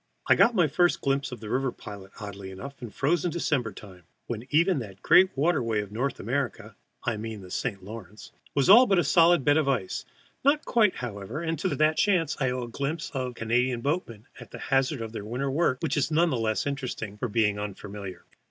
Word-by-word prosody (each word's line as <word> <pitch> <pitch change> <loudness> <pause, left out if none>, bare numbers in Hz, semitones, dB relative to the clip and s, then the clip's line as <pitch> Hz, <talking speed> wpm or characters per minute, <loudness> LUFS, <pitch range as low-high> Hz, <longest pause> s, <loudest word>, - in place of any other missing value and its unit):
I - - +7
got 235 - +4
my 175 -5 +4
first 175 +4 +2
glimpse 135 0 0
of 120 -3 -8
the 110 - -7
river 130 0 0
pilot, 100 -4 -10
oddly 100 -2 -7
enough, 130 +9 -9
in 120 - -6
frozen 165 - 0
December 145 -8 -1
time, 95 -2 -13 0.2
when 120 +1 -5
even 170 +2 +3
that 100 -5 -9
great 185 +1 +6
waterway 125 -8 +1
of 105 -1 -9
northern 125 +1 -3
America 135 +1 -2 0.3
I 120 -3 -1
mean 110 -1 -6
the 90 -1 -12
St. 100 -5 -3
Lawrence 105 0 -10 0.2
was 140 -2 +2
all 235 +6 +9
but 195 - +3
a 175 - +4
solid 170 0 +4
bed 145 +1 +5
of 150 -3 +2
ice, 110 -9 -1 0.4
not 285 +3 +3
quite, 215 -5 +3
however, 115 - -5
and 165 -2 -2
to 180 -7 -1
that 155 +2 +2
chance 180 -7 +2
I 130 -3 +1
owed 125 -1 -3
a - - -14
glimpse 150 +6 -3
of 130 -2 -3
Canadian 120 +2 0
boatmen 125 - -3
at - - -11
the - - -9
hazard 135 -1 0
of 115 -1 -5
their 110 - -6
winter 125 +6 -2
work, 140 -3 +1
which 140 - 0
is 145 - +1
none 165 +2 +3
the - - +1
less 110 -1 0
interesting 125 -7 -4
for 120 - -1
being 105 -2 +1
unfamiliar. 100 -1 -7
130 Hz, 215 wpm, -27 LUFS, 110-155 Hz, 0.4 s, all